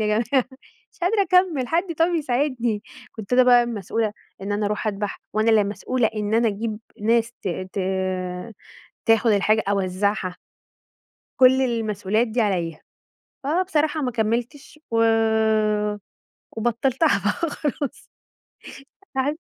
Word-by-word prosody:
يا 215 Hz, -, +1 dB
جماعة 240 Hz, +3 st, +1 dB, 0.5 s
مش -, -, -26 dB
قادرة 400 Hz, +3 st, +3 dB
أكمّل، 360 Hz, -8 st, +2 dB
حد 335 Hz, +1 st, 0 dB
طب 330 Hz, -, +5 dB
يساعدني، 250 Hz, -7 st, 0 dB, 0.3 s
كنت 220 Hz, 0 st, -9 dB
أنا 255 Hz, +1 st, +6 dB
بقى 245 Hz, -1 st, +6 dB
المسؤولة 220 Hz, -1 st, -2 dB, 0.3 s
إن 205 Hz, +1 st, -3 dB
أنا 205 Hz, 0 st, 0 dB
أروح 210 Hz, +2 st, -2 dB
أدبح، 205 Hz, -1 st, -3 dB
وأنا 215 Hz, +2 st, +2 dB
اللي 215 Hz, -2 st, +4 dB
مسؤولة 225 Hz, +4 st, -1 dB
إن 210 Hz, 0 st, -1 dB
أنا 230 Hz, 0 st, +3 dB
أجيب 215 Hz, +1 st, -3 dB, 0.2 s
ناس 230 Hz, +2 st, +2 dB
ت 195 Hz, -, -2 dB, 0.2 s
ت -, -, -4 dB, 1.3 s
تاخد 225 Hz, 0 st, +4 dB
الحاجة 215 Hz, +2 st, +3 dB
أوزعها. 190 Hz, -1 st, -1 dB, 1.0 s
كل 260 Hz, +1 st, +6 dB
المسؤوليات 220 Hz, -2 st, 0 dB
دي 230 Hz, +2 st, -1 dB
عليَّ، 175 Hz, -7 st, -1 dB, 0.6 s
فبصراحة 315 Hz, 0 st, 0 dB
ما 255 Hz, -3 st, -1 dB
كمّلتش 240 Hz, +7 st, -2 dB
و 230 Hz, -, +1 dB, 1.6 s
وبطّلتها 240 Hz, +6 st, +1 dB
بقى 305 Hz, +10 st, 0 dB
خلاص، 285 Hz, -2 st, -4 dB, 1.0 s
تعبت. 285 Hz, +4 st, 0 dB
230 Hz, 125 wpm, -23 LUFS, 210-270 Hz, 1.6 s, أنا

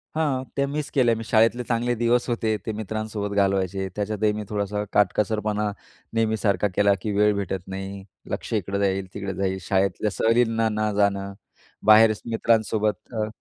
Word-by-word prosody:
हां, 145 Hz, -5 st, 0 dB
त्या 140 Hz, 0 st, +1 dB
मिस 145 Hz, +1 st, -3 dB
केल्या 120 Hz, -4 st, +3 dB
मी 115 Hz, -, -5 dB
शाळेतले 115 Hz, +2 st, +3 dB
चांगले 120 Hz, +1 st, 0 dB
दिवस 120 Hz, +1 st, +1 dB
होते, 115 Hz, -2 st, 0 dB
ते -, -, -2 dB
मित्रांसोबत 110 Hz, -1 st, -4 dB
घालवायचे. 95 Hz, -1 st, +1 dB
त्याच्यातही 105 Hz, 0 st, 0 dB
मी 105 Hz, 0 st, -4 dB
थोडासा 105 Hz, 0 st, -2 dB
काटकसरपणा 105 Hz, 0 st, +1 dB, 0.4 s
नेहमीसारखा 110 Hz, -3 st, +1 dB
केला 100 Hz, 0 st, +4 dB
की 105 Hz, -, -2 dB
वेळ 105 Hz, 0 st, +4 dB
भेटत 95 Hz, -2 st, -3 dB
नाही, 95 Hz, +1 st, -6 dB, 0.3 s
लक्ष -, -, -4 dB
इकडं 100 Hz, -2 st, -1 dB
जाईल, 95 Hz, -1 st, 0 dB
तिकडं 100 Hz, -1 st, -4 dB
जाईल. 95 Hz, -1 st, -1 dB
शाळेतल्या 95 Hz, +3 st, 0 dB
सहलीना 115 Hz, 0 st, +2 dB
न 105 Hz, 0 st, 0 dB
जाणं, 100 Hz, -1 st, +1 dB, 0.5 s
बाहेर 110 Hz, +1 st, +7 dB
मित्रांसोबत 110 Hz, -1 st, 0 dB
अ 110 Hz, -2 st, -1 dB
105 Hz, 150 wpm, -24 LUFS, 100-115 Hz, 0.5 s, बाहेर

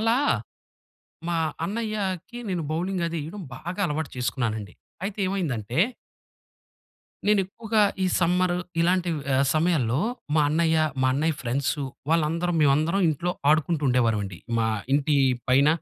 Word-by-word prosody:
అలా 225 Hz, +2 st, +3 dB, 1.1 s
మా 170 Hz, -, 0 dB, 0.3 s
అన్నయ్యకి 210 Hz, -1 st, -3 dB
నేను 175 Hz, -3 st, -1 dB
బౌలింగది 170 Hz, 0 st, -1 dB
ఏయడం 190 Hz, +5 st, -7 dB
బాగా 175 Hz, +7 st, -5 dB
అలవాటు 155 Hz, -1 st, -2 dB
చేసుకున్నానునండి. 110 Hz, -5 st, -2 dB, 0.3 s
అయితే 200 Hz, +1 st, -4 dB
ఏమైందంటే 135 Hz, -, -2 dB, 1.5 s
నేనెక్కువగా 210 Hz, +2 st, +2 dB, 0.2 s
ఈ -, -, +3 dB
సమ్మరు 180 Hz, +1 st, +2 dB, 0.2 s
ఇలాంటి 180 Hz, +1 st, +2 dB
వ్ 150 Hz, -, -4 dB
ఆహ్, 135 Hz, -, +3 dB
సమయాల్లో 155 Hz, -7 st, +2 dB, 0.4 s
మా 155 Hz, -, +4 dB
అన్నయ్య, 160 Hz, +1 st, +2 dB, 0.3 s
మా -, -, +4 dB
అన్నయ్య 155 Hz, +3 st, +1 dB
ఫ్రెండ్స్ 130 Hz, +5 st, 0 dB, 0.4 s
వాళ్ళందరం 165 Hz, +2 st, +1 dB
మేమందరం 155 Hz, +6 st, +3 dB
ఇంట్లో 170 Hz, +4 st, -1 dB, 0.2 s
ఆడుకుంటూ 155 Hz, 0 st, +2 dB
ఉండేవారమండి. 110 Hz, -7 st, +1 dB, 0.2 s
మా 115 Hz, -, +2 dB, 0.3 s
ఇంటి 145 Hz, +1 st, +2 dB, 0.3 s
పైన 135 Hz, +3 st, +5 dB
165 Hz, 120 wpm, -25 LUFS, 135-185 Hz, 1.5 s, పైన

